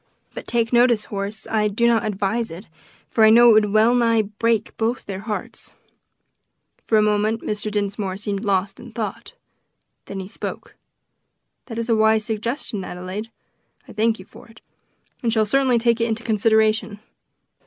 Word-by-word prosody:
But - - -8
take 230 0 0
notice, 240 -2 +4
Horace, 200 0 -5
I 215 -1 +1
do 210 +3 0
not 230 -2 +3
advise 215 +3 -1
it, 175 +6 -9 0.4
for 225 - +2
I 220 - +8
know 235 +1 +7
it - - +7
would 210 -1 +3
wellnigh 230 +1 +3 0.2
break 230 -2 0
both 230 +2 -2
their 190 -1 -5
hearts." 210 +1 -6 1.1
For 220 - +2
a 215 - +4
moment 210 +1 +1
Mr. 210 0 -2
Dinsmore 200 -2 -2
seemed 205 0 -4
lost 195 -1 -1
in 240 - -11
thought. 230 - -5 0.7
Then 195 - -6
he 190 - -6
spoke: 205 - -7 0.9
"That 225 -3 -7
is 230 0 -2
a 230 - +3
wise 220 0 +3
suggestion, 220 -1 -3
Adelaide. 185 +5 -6 0.6
I - - -11
thank 225 +1 +1
you 185 - -12
for - - -16
it, 225 -1 -18 0.6
and 235 -3 0
shall 220 -1 +2
certainly 260 +2 +2
take 235 0 +1
it 230 - +2
into 225 +1 -3
consideration. 220 -1 +1
220 Hz, 165 wpm, -22 LUFS, 205-230 Hz, 1.1 s, I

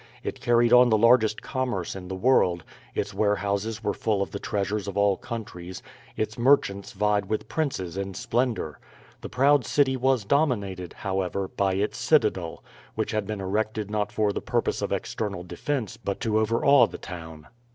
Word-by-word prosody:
It - - -5
carried 120 0 +3
on 125 0 +7
the 110 - +4
largest 115 -1 +4
commerce 125 -11 -2
in 90 -2 -8
the 95 - -4
world, 95 -6 +3 0.3
its - - -2
warehouses 105 +1 -1
were 105 -1 0
full 105 -2 0
of - - -8
the 100 - -5
treasures 100 0 -2
of 100 0 -5
all 100 -1 +4
countries, 95 -7 -7 0.3
its 110 +1 -3
merchants 120 -6 +2
vied 105 -1 +1
with 110 - -2
princes 95 - -2
in 95 -1 -4
splendour. 115 - -1 0.4
The - - -7
proud 140 +1 +4
city 130 +2 +2
was 130 -4 +1
dominated, 100 - 0
however, 95 0 -2
by 95 -1 0
its 100 +2 -1
citadel, 95 - +1 0.3
which - - -1
had 105 -2 -1
been 105 -2 -4
erected 105 +2 -2
not 105 -1 -1
for 105 -2 +1
the - - -3
purpose - - -1
of - - -2
external 100 -5 -3
defence 115 - -3
but 100 -4 -4
to 110 -2 +1
overawe 115 +5 +4
the - - -8
town. 80 -4 -9
105 Hz, 170 wpm, -26 LUFS, 95-120 Hz, 0.4 s, on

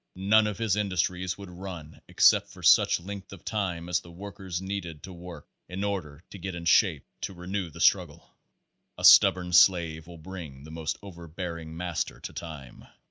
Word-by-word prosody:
None 105 +3 +4
of 105 -3 -4
his 110 -4 +1
industries 90 -2 -1
would 100 -2 -10
run 85 -4 -9
except - - +4
for - - -14
such - - +5
length 100 +2 -8
of 100 -4 -12
time 90 -6 -2
as 90 - +1
the 85 - -15
work 95 +3 -10
ers 90 -3 -4
needed 95 -5 -5
to 95 - -9
work 85 -3 -10 0.2
in 95 +2 -4
order 90 -7 -4
to 100 - -9
get 95 0 -5
in 85 -1 -7
shape 85 -3 +3 0.2
to 95 - -5
renew 90 +1 -4
the - - -10
struggle. - - +1 0.6
A - - -1
stubborn 90 -1 +7
slave 85 -2 +4
will 85 -1 -11
bring 80 -5 -9
the 80 - -11
most 80 -1 -3
overbearing 85 -3 -7
master 90 -1 -3
to - - -7
time. 75 -6 -9
90 Hz, 185 wpm, -27 LUFS, 85-95 Hz, 0.6 s, stubborn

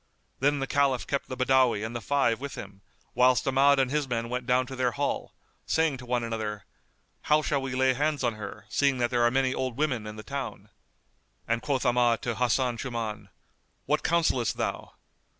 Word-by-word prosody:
Then 145 +2 +2
the 135 - -1
Caliph 135 -3 +1
kept 140 - -2
the 130 - -5
Badawi 130 -4 +3
and 115 +2 -6
the 120 - -3
five 120 -1 +1
with 140 0 -5
him, 100 -1 -9 0.3
whilst 125 +2 +3
Ahmad 140 +1 +5
and 135 -1 +1
his 150 -1 0
men 115 -1 -2
went 125 0 -3
down 125 +1 +3
to 130 - -8
their 125 -2 0
hall,[FN#208] 140 0 -5
saying 160 -4 +2
to 125 -1 -11
one 120 -1 0
another, 110 -2 -4 0.6
"How 155 0 +4
shall 140 -2 0
we 135 -1 -4
lay 130 0 +3
hands 145 +2 0
on 120 -2 +1
her, 105 0 -8
seeing 140 +4 +1
that 120 0 0
there 120 -1 +1
are 120 - +5
many 130 +1 +1
old 130 -3 -3
women 130 -8 -1
in 105 - -7
the 110 - -9
town?" 140 +1 -6 0.8
And 115 0 0
quoth 135 -3 -1
Ahmad 120 -1 +2
to 120 - -1
Hasan 125 +1 +1
Shuman, 110 -5 -4 0.6
"What 150 +2 +1
counsellest 160 -8 +1
thou?" - - -3
125 Hz, 200 wpm, -27 LUFS, 115-140 Hz, 0.8 s, Ahmad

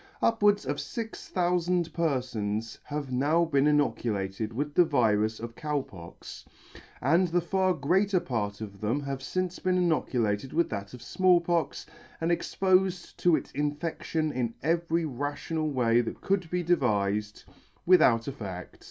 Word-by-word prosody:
Upwards 205 -5 +3
of 145 +2 -2
fix 225 -1 -6
thoufand 175 -1 +1
perfons 120 -9 -2
have 145 -2 -4
now 150 +7 +2
been 140 -3 +2
inoculated 110 -8 0
with 145 +5 -3
the 180 - +6
virus 110 -8 +1
of 115 +1 -6
Cow 150 +3 -2
Pox, 85 -7 -11 0.6
and 170 +6 +3
the 175 +1 +1
far 185 +1 +1
greater 185 +7 +2
part 105 -7 -3
of 100 -2 -8
them 115 +7 0
have 140 -1 -4
fince 185 +5 -3
been 185 -1 +1
inoculated 130 - 0
with 170 +1 +2
that 100 +1 -5
of 120 - -12
Small 185 +6 +4
Pox, 170 -1 -1 0.3
and 165 +1 0
expofed 185 +1 +1
to 175 -2 +4
its 145 - -4
infedlion 150 +1 -2
in 120 -2 -2
every 165 +1 +1
rational 145 +3 -3
way 120 -4 +3
that 115 - -5
could 190 -4 0
be 180 +1 -1
devifed, 105 - 0 0.4
with 180 -1 +6
out 115 -4 +4
effect. 100 -10 -7
145 Hz, 150 wpm, -28 LUFS, 115-175 Hz, 0.6 s, the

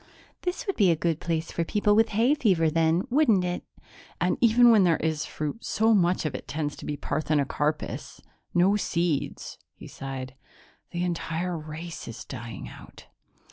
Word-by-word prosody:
"This 370 +7 -3
would 390 - -2
be 200 -4 +5
a 165 - +4
good 165 0 -1
place 165 -1 -2
for 170 - -1
people 205 +4 +2
with 225 +1 +4
hay 230 +7 +3
fever 185 - +2
then, 165 +2 +2
wouldn't 240 -9 +4
it?" 175 0 -3 0.6
"And - - +2
even 240 0 +6
when 215 -4 +6
there 170 -3 +3
is 155 -1 -1
fruit, 155 +9 -5
so 225 +1 +2
much 180 -4 +2
of 150 - -1
it 130 - -7
tends 150 -1 -3
to - - -9
be 145 - -3
parthenocarpous 150 0 -2 0.3
no 185 +3 +4
seeds." 170 -6 -2 0.2
He - - -12
sighed. 130 -1 -6 0.6
"The 175 0 -3
entire 175 0 -2
race 160 +2 -7
is 115 - -8
dying 115 -5 -7
out." - - -13
170 Hz, 170 wpm, -26 LUFS, 155-205 Hz, 0.6 s, even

